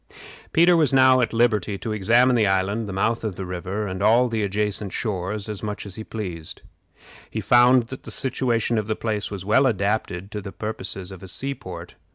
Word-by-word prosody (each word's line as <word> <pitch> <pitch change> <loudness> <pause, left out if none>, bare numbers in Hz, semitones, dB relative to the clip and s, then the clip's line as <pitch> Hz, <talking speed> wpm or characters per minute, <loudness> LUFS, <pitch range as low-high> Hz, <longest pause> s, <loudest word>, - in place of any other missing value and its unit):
Peter 175 +2 +5
was 155 -5 +3
now 130 -1 +5
at 115 - 0
liberty 110 -3 +1
to 110 - -5
examine 120 +5 +3
the 110 -3 +3
island, 100 +3 0
the - - -4
mouth 115 +5 0
of 105 -4 -3
the 95 - -5
river, 95 +4 -4
and 95 -1 -5
all 115 +4 +4
the 115 -2 -2
adjacent 105 0 -1
shores, 100 0 -3
as 105 -2 -6
much 105 -1 -5
as 100 - -7
he 110 - -7
pleased. 90 -9 -7 0.7
He - - -4
found 125 -1 +4
that 130 - -7
the - - -10
situation 120 -4 0
of 105 - -4
the 110 - -1
place 105 -3 -2
was 95 -2 -7
well 130 +6 +4
adapted 100 -3 -1
to 105 - -5
the 100 0 -7
purposes 100 -3 -3
of 95 - -10
a 95 - -9
sea 135 +9 -4
port. 90 -8 -10
105 Hz, 210 wpm, -23 LUFS, 95-120 Hz, 0.7 s, Peter